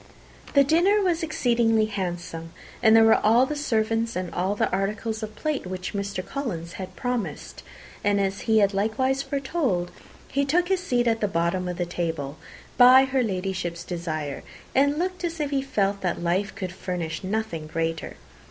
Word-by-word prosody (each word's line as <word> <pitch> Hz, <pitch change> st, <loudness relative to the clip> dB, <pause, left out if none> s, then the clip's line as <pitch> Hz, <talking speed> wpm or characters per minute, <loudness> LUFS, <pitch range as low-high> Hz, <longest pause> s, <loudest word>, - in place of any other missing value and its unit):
The 280 Hz, -, +7 dB
dinner 345 Hz, +9 st, +4 dB
was 350 Hz, -2 st, +1 dB
exceedingly 235 Hz, -8 st, +2 dB
handsome, 175 Hz, -5 st, -5 dB, 0.3 s
and 220 Hz, -1 st, +6 dB
there 225 Hz, -, +8 dB
were 225 Hz, 0 st, +5 dB
all 230 Hz, +4 st, +5 dB
the 300 Hz, -, -3 dB
servants, 225 Hz, -4 st, 0 dB
and 180 Hz, -2 st, -3 dB
all 190 Hz, +3 st, 0 dB
the -, -, +1 dB
articles 210 Hz, +3 st, -2 dB
of 215 Hz, 0 st, -6 dB
plate 305 Hz, -10 st, -2 dB
which 185 Hz, +1 st, -5 dB
Mr. 200 Hz, -2 st, -3 dB
Collins 180 Hz, -, -4 dB
had 185 Hz, 0 st, -7 dB
promised; 245 Hz, -3 st, -4 dB, 0.4 s
and, 205 Hz, 0 st, +2 dB
as 195 Hz, 0 st, -1 dB
he 220 Hz, -, +5 dB
had 200 Hz, -1 st, +4 dB
likewise 260 Hz, +7 st, +1 dB
foretold, 270 Hz, -, -1 dB, 0.4 s
he 280 Hz, -, 0 dB
took 345 Hz, +6 st, +1 dB
his 380 Hz, -1 st, +2 dB
seat 245 Hz, -8 st, 0 dB
at 225 Hz, -1 st, +1 dB
the 210 Hz, -, +2 dB
bottom 180 Hz, 0 st, 0 dB
of 180 Hz, -1 st, -4 dB
the 175 Hz, -, -1 dB
table, 160 Hz, -5 st, -3 dB, 0.4 s
by 255 Hz, +2 st, +8 dB
her 265 Hz, 0 st, +1 dB
Ladyship's 185 Hz, -5 st, -2 dB
desire, 155 Hz, -5 st, -4 dB, 0.3 s
and 285 Hz, +2 st, +3 dB
looked 365 Hz, +2 st, -2 dB
as 335 Hz, -1 st, -3 dB
if 295 Hz, -2 st, -1 dB
he 275 Hz, -1 st, +1 dB
felt 200 Hz, -7 st, 0 dB
that 180 Hz, -, -1 dB
life 180 Hz, +4 st, -1 dB
could 185 Hz, -4 st, -4 dB
furnish 180 Hz, -3 st, -4 dB
nothing 190 Hz, -6 st, -3 dB
greater. 165 Hz, 0 st, -3 dB
210 Hz, 175 wpm, -25 LUFS, 180-265 Hz, 0.4 s, there